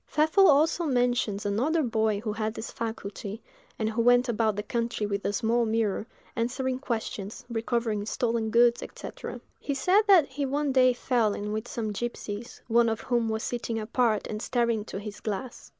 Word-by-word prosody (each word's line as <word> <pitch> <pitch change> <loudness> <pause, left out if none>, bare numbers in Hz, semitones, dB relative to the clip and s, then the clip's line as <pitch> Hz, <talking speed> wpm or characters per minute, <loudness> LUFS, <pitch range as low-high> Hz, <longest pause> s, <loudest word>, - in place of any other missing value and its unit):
Pfeffel 315 +6 +4
also 315 +4 +4
mentions 245 -6 +1
another 270 +11 +1
boy 220 -4 +1
who 215 -2 -2
had 215 0 -2
this 220 - -6
faculty, 215 -2 -5 0.4
and 220 - -1
who 225 +1 0
went 245 +2 +5
about 220 -2 +1
the 210 - -3
country 230 -1 -2
with 200 -1 -2
a - - +1
small 230 +3 +1
mirror, 220 -1 0 0.3
answering 255 +2 -1
questions, 220 -5 -4
recovering 225 -2 -1
stolen 230 -1 0
goods, 235 +1 +4
&c. - - -6 0.5
He 280 - -3
said 370 +9 +4
that 370 -7 +7
he 280 +2 -4
one 285 +1 0
day 255 -1 +5
fell 240 -4 +1
in 210 0 -4
with 215 +2 -3
some 220 -3 -3
gipsies, 235 0 -5
one 235 0 +4
of 225 -1 -2
whom 235 -3 0
was 220 0 -2
sitting 235 -1 -3
apart 225 0 +1
and 215 0 -5
staring 235 -3 +1
into 210 -1 -6
this 205 +1 -7
glass. 230 +5 -5
230 Hz, 180 wpm, -27 LUFS, 215-250 Hz, 0.5 s, that